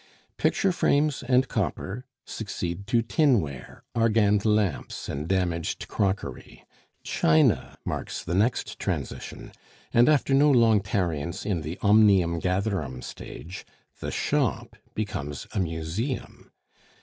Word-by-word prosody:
Picture 195 Hz, -, +2 dB
frames 150 Hz, -4 st, +2 dB
and 130 Hz, 0 st, +2 dB
copper 120 Hz, +7 st, -3 dB, 0.2 s
succeed 100 Hz, -3 st, -5 dB
to 115 Hz, +1 st, +2 dB
tin 135 Hz, 0 st, +3 dB
ware, 70 Hz, -6 st, -7 dB
argand 105 Hz, -3 st, +3 dB
lamps, 105 Hz, -7 st, 0 dB
and 75 Hz, +3 st, -4 dB
damaged 90 Hz, -3 st, -1 dB
crockery; 100 Hz, -1 st, -3 dB, 0.4 s
china 80 Hz, 0 st, +2 dB
marks -, -, -4 dB
the 85 Hz, -, -3 dB
next 110 Hz, +7 st, 0 dB
transition; -, -, -4 dB, 0.4 s
and 120 Hz, +3 st, +6 dB
after 145 Hz, -2 st, +3 dB
no 145 Hz, +2 st, +5 dB
long 115 Hz, -6 st, +5 dB
tarriance 85 Hz, -4 st, -2 dB
in 95 Hz, -6 st, -1 dB
the 80 Hz, +4 st, -5 dB
"omnium 100 Hz, -5 st, +5 dB
gatherum" 90 Hz, -, -1 dB
stage, 90 Hz, +4 st, -8 dB, 0.4 s
the -, -, -4 dB
shop -, -, -1 dB, 0.2 s
becomes 75 Hz, -10 st, -4 dB
a -, -, -1 dB
museum. 85 Hz, -, -3 dB
100 Hz, 115 wpm, -26 LUFS, 85-115 Hz, 0.4 s, and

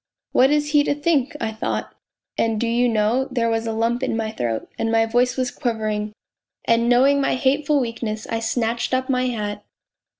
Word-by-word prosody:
' -, -, -63 dB
What 260 Hz, +1 st, +5 dB
is 295 Hz, 0 st, +1 dB
he 295 Hz, -1 st, +5 dB
to 285 Hz, -, +1 dB
think? 295 Hz, -3 st, 0 dB
' -, -, -22 dB
I 220 Hz, -, -2 dB
thought; 220 Hz, -, -3 dB, 0.4 s
and 225 Hz, -1 st, 0 dB
do 235 Hz, -, 0 dB
you 240 Hz, +1 st, +2 dB
know, 225 Hz, +4 st, +1 dB
there 235 Hz, -3 st, 0 dB
was 225 Hz, 0 st, -1 dB
a -, -, -1 dB
lump 230 Hz, +2 st, 0 dB
in 260 Hz, -4 st, -1 dB
my 220 Hz, -1 st, -2 dB
throat, 115 Hz, -, -3 dB
and 225 Hz, 0 st, 0 dB
my 225 Hz, 0 st, +3 dB
voice 245 Hz, +3 st, +1 dB
was 255 Hz, -1 st, -1 dB
quivering, 215 Hz, -4 st, -2 dB, 0.5 s
and 230 Hz, +1 st, +2 dB
knowing 275 Hz, +3 st, +4 dB
my -, -, +1 dB
hateful 280 Hz, +3 st, +2 dB
weakness, 230 Hz, -3 st, -3 dB
I 225 Hz, -, -2 dB
snatched 230 Hz, +2 st, -1 dB
up 260 Hz, +1 st, -2 dB
my 255 Hz, 0 st, +1 dB
hat. 210 Hz, -3 st, -4 dB
235 Hz, 205 wpm, -22 LUFS, 225-260 Hz, 0.5 s, What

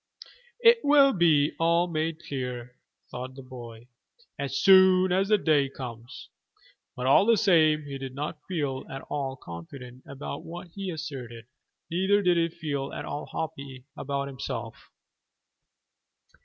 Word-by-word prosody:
"It 465 Hz, 0 st, +7 dB
will 285 Hz, -2 st, +6 dB, 0.5 s
all 170 Hz, +1 st, +3 dB
be 175 Hz, -, -8 dB
made 160 Hz, +1 st, -2 dB
clear," 125 Hz, -2 st, -5 dB, 0.4 s
thought 130 Hz, +1 st, -6 dB
the 135 Hz, -, -10 dB
boy, 120 Hz, -2 st, -11 dB, 0.5 s
"as 135 Hz, -1 st, -2 dB
soon 185 Hz, -1 st, +6 dB
as 190 Hz, +2 st, +2 dB
the 210 Hz, 0 st, +4 dB
day 150 Hz, -7 st, +2 dB
comes." 120 Hz, -3 st, -9 dB, 0.7 s
But 125 Hz, -, -4 dB
all 140 Hz, +10 st, +5 dB
the 230 Hz, -1 st, +5 dB
same 155 Hz, -6 st, +4 dB
he 140 Hz, -1 st, -7 dB
did 135 Hz, -1 st, -7 dB
not 150 Hz, +2 st, -4 dB
feel 145 Hz, -7 st, -2 dB
at 135 Hz, -, -7 dB
all 135 Hz, -2 st, -2 dB
confident 125 Hz, -, -10 dB
about 140 Hz, +1 st, -7 dB
what 175 Hz, +1 st, -9 dB
he 195 Hz, +2 st, -6 dB
asserted, 135 Hz, -8 st, -7 dB, 0.5 s
neither 190 Hz, +4 st, +2 dB
did 180 Hz, -1 st, +4 dB
he 165 Hz, 0 st, +2 dB
feel 145 Hz, -5 st, -4 dB
at -, -, -6 dB
all 145 Hz, +1 st, -5 dB
happy 140 Hz, -5 st, -6 dB
about 140 Hz, 0 st, -3 dB
himself. 135 Hz, -2 st, -6 dB
145 Hz, 140 wpm, -27 LUFS, 130-175 Hz, 0.7 s, It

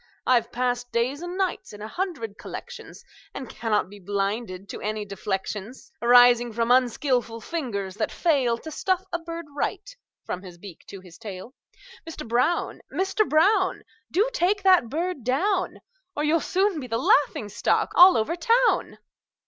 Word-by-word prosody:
I've 240 Hz, -2 st, +2 dB
passed 245 Hz, 0 st, -2 dB
days 255 Hz, +6 st, -1 dB
and 350 Hz, +1 st, -5 dB
nights 380 Hz, -, -2 dB
in 205 Hz, -, -10 dB
a -, -, -5 dB
hundred 255 Hz, -, -4 dB
collections, 485 Hz, 0 st, -9 dB, 0.3 s
And 265 Hz, -, -6 dB
cannot 220 Hz, -2 st, -1 dB
be 205 Hz, +2 st, -13 dB
blinded 200 Hz, 0 st, -3 dB
to -, -, -7 dB
any 215 Hz, 0 st, -3 dB
deflections 205 Hz, +5 st, -5 dB
Arising 240 Hz, -1 st, +6 dB
from 230 Hz, +1 st, 0 dB
unskilful 250 Hz, -1 st, +1 dB
fingers 220 Hz, -, -4 dB
that 215 Hz, -, -1 dB
fail 270 Hz, -8 st, +1 dB
To 315 Hz, +6 st, -9 dB
stuff 375 Hz, +4 st, 0 dB
a 345 Hz, -, 0 dB
bird 335 Hz, 0 st, -7 dB
right, -, -, -3 dB, 0.3 s
from 180 Hz, -, -4 dB
his 180 Hz, -3 st, -11 dB
beak 180 Hz, -2 st, -12 dB
to 195 Hz, -, -9 dB
his 180 Hz, -2 st, -15 dB
tail. 205 Hz, +3 st, -8 dB, 0.5 s
Mister 325 Hz, -1 st, -8 dB
Brown! 245 Hz, +9 st, 0 dB
Mister 385 Hz, +3 st, +1 dB
Brown! 370 Hz, +4 st, +2 dB, 0.3 s
Do 410 Hz, +7 st, +2 dB
take 400 Hz, -3 st, +1 dB
that 365 Hz, -11 st, +5 dB
bird 330 Hz, -1 st, -3 dB
down, 360 Hz, -, 0 dB, 0.3 s
Or 295 Hz, -, -1 dB
you'll 310 Hz, +2 st, +3 dB
soon 380 Hz, -2 st, +1 dB
be 255 Hz, -, -7 dB
the 230 Hz, -1 st, -1 dB
laughing 270 Hz, -4 st, +2 dB
stock 205 Hz, -, 0 dB
all 360 Hz, +1 st, +8 dB
over 225 Hz, +10 st, 0 dB
town!" 465 Hz, +9 st, +2 dB
250 Hz, 160 wpm, -25 LUFS, 215-345 Hz, 0.5 s, all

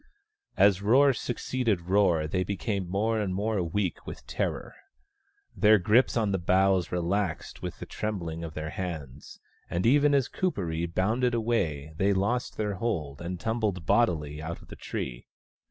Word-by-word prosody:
As 100 Hz, -1 st, +5 dB
roar 135 Hz, +7 st, +5 dB
succeeded 120 Hz, -5 st, -1 dB
roar 90 Hz, -3 st, +2 dB
they 90 Hz, +4 st, 0 dB
became 100 Hz, -1 st, -3 dB
more 110 Hz, +4 st, 0 dB
and 95 Hz, -3 st, -1 dB
more 105 Hz, 0 st, 0 dB
weak 90 Hz, +2 st, -2 dB
with -, -, -8 dB
terror. -, -, -3 dB, 0.8 s
Their 110 Hz, 0 st, +6 dB
grip 110 Hz, +7 st, +3 dB
on 110 Hz, -3 st, +1 dB
the 95 Hz, -, 0 dB
boughs 95 Hz, 0 st, +2 dB
relaxed 90 Hz, +1 st, -2 dB
with -, -, -5 dB
the -, -, -7 dB
trembling 85 Hz, -6 st, -4 dB
of 80 Hz, -2 st, -7 dB
their 80 Hz, 0 st, -4 dB
hands, 75 Hz, -8 st, -6 dB, 0.3 s
and 85 Hz, +4 st, -1 dB
even 145 Hz, +4 st, +5 dB
as 135 Hz, -3 st, +2 dB
Kuperee 85 Hz, -, -2 dB
bounded 115 Hz, +8 st, +1 dB
away 85 Hz, -11 st, -1 dB
they 100 Hz, +2 st, +3 dB
lost 100 Hz, +6 st, -1 dB
their 105 Hz, -1 st, -1 dB
hold 90 Hz, -10 st, -3 dB
and 90 Hz, +1 st, -4 dB
tumbled 110 Hz, -6 st, -1 dB
bodily 75 Hz, -10 st, +1 dB
out 80 Hz, +2 st, -5 dB
of -, -, -17 dB
the -, -, -8 dB
tree. -, -, -5 dB
95 Hz, 155 wpm, -28 LUFS, 85-110 Hz, 0.8 s, Their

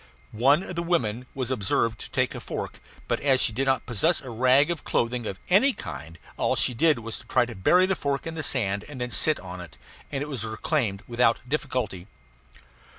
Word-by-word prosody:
One 140 Hz, -, +3 dB
of 185 Hz, -, -7 dB
the 170 Hz, -, -1 dB
women 125 Hz, -9 st, -1 dB
was 130 Hz, -1 st, -2 dB
observed 110 Hz, 0 st, 0 dB
to -, -, -8 dB
take -, -, 0 dB
a -, -, -6 dB
fork; -, -, -6 dB, 0.3 s
but -, -, 0 dB
as 135 Hz, -2 st, +3 dB
she 110 Hz, -, +2 dB
did 135 Hz, +5 st, 0 dB
not 130 Hz, -1 st, +1 dB
possess 155 Hz, -, +2 dB
a 130 Hz, -, -9 dB
rag 130 Hz, +7 st, +4 dB
of 170 Hz, -, -4 dB
clothing 120 Hz, -1 st, -1 dB
of 95 Hz, -, -4 dB
any 230 Hz, +10 st, +5 dB
kind 80 Hz, -, -8 dB, 0.2 s
all -, -, +1 dB
she -, -, +2 dB
did 155 Hz, +5 st, +3 dB
do 115 Hz, -, -9 dB
was 115 Hz, 0 st, -4 dB
to -, -, -15 dB
try 125 Hz, -1 st, +3 dB
to 120 Hz, -, -8 dB
bury 175 Hz, -, +4 dB
the 190 Hz, 0 st, +1 dB
fork 140 Hz, -2 st, -2 dB
in 165 Hz, -, -4 dB
the 160 Hz, -, -4 dB
sand 100 Hz, -8 st, 0 dB
and 140 Hz, -3 st, -8 dB
then 125 Hz, 0 st, -3 dB
sit 155 Hz, +5 st, +3 dB
on 90 Hz, -1 st, -8 dB
it; 85 Hz, -, -12 dB, 0.3 s
and 140 Hz, -1 st, -2 dB
it -, -, -6 dB
was 135 Hz, -7 st, -4 dB
reclaimed 110 Hz, -2 st, -1 dB
without 120 Hz, -1 st, +2 dB
difficulty. 125 Hz, -10 st, -2 dB
125 Hz, 220 wpm, -26 LUFS, 110-150 Hz, 0.3 s, any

